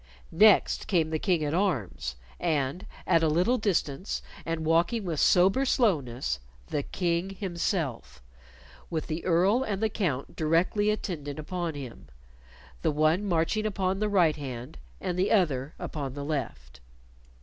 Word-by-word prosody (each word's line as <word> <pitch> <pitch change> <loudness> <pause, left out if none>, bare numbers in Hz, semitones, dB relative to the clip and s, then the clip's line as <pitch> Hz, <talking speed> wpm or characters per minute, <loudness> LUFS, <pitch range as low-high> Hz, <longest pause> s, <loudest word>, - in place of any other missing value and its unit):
Next 205 +5 +4
came 165 -6 +1
the 155 - 0
King 175 -3 +1
at 145 - -1
arms 105 - -1 0.2
and, 155 -1 -1 0.2
at 165 - +4
a 160 - +3
little 180 +11 +2
distance 185 -4 -1 0.2
and 165 -1 -2
walking 170 +7 +2
with 165 -4 -2
sober 195 +9 +4
slowness, 135 - +1 0.3
the 145 - 0
King 175 +4 -1
himself, 170 - -3 0.7
with 160 -2 -2
the 160 +2 -4
Earl 185 +7 +3
and 205 -6 -2
the 220 +1 +1
Count 160 -11 -2
directly 170 +6 +2
attendant 160 -9 -3
upon 165 +1 -3
him 130 -5 -8 0.7
the - - +2
one 155 +6 +2
marching 190 +4 +1
upon 190 -2 -1
the 215 0 0
right 175 -7 +3
hand 125 - -7 0.2
and 180 0 -3
the 190 - +2
other 150 - +1
upon 140 -4 -5
the 140 -1 -5
left. 70 - -4
165 Hz, 145 wpm, -28 LUFS, 145-190 Hz, 0.7 s, Next